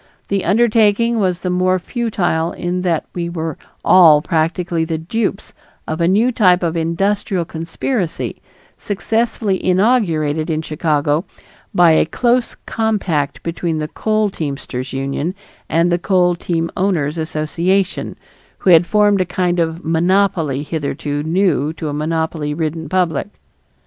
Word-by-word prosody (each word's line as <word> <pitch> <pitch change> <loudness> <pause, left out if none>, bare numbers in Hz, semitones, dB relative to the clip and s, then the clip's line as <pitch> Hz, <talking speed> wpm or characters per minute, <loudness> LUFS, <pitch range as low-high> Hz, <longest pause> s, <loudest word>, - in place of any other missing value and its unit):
The 195 -1 0
undertaking 225 +2 +3
was 180 -3 0
the 180 - -2
more 185 +1 +2
futile 185 -6 -1
in 180 +1 -3
that 170 -3 0
we 170 -1 -3
were 165 -3 -4 0.3
all 165 -5 +7
practically 165 +1 -1
the 160 0 -2
dupes 195 +5 -3 0.3
of 160 +2 -3
a 170 - +3
new 215 +7 +3
type 185 -6 +3
of 170 -1 -1
"industrial 180 +2 0
conspiracy" 165 +4 -3 0.3
successfully 215 -1 -1
inaugurated 180 -7 +1
in 160 0 -1
Chicago 150 0 0 0.5
by 175 -2 +5
a 160 - +3
close 240 +7 +1
compact 195 -10 -1
between 170 -1 -2
the 155 0 -3
coal 215 +1 0
teamsters' 140 -5 -5
union 140 +6 -3 0.3
and 170 +2 +2
the 175 - +1
coal 180 -1 +2
team 170 -1 -2
owners' 170 -5 0
association, 165 +5 -1 0.4
who 185 - +2
had 170 +1 +6
formed 205 -2 +3
a - - +4
kind 180 0 -1
of 165 +1 -2
monopoly 165 -4 +1
hitherto 145 -1 -3
new 160 -2 +1
to 160 -2 -5
a - - -4
monopoly 155 -1 -2
ridden 160 -1 -3
public. 180 -2 0
170 Hz, 135 wpm, -18 LUFS, 160-195 Hz, 0.5 s, all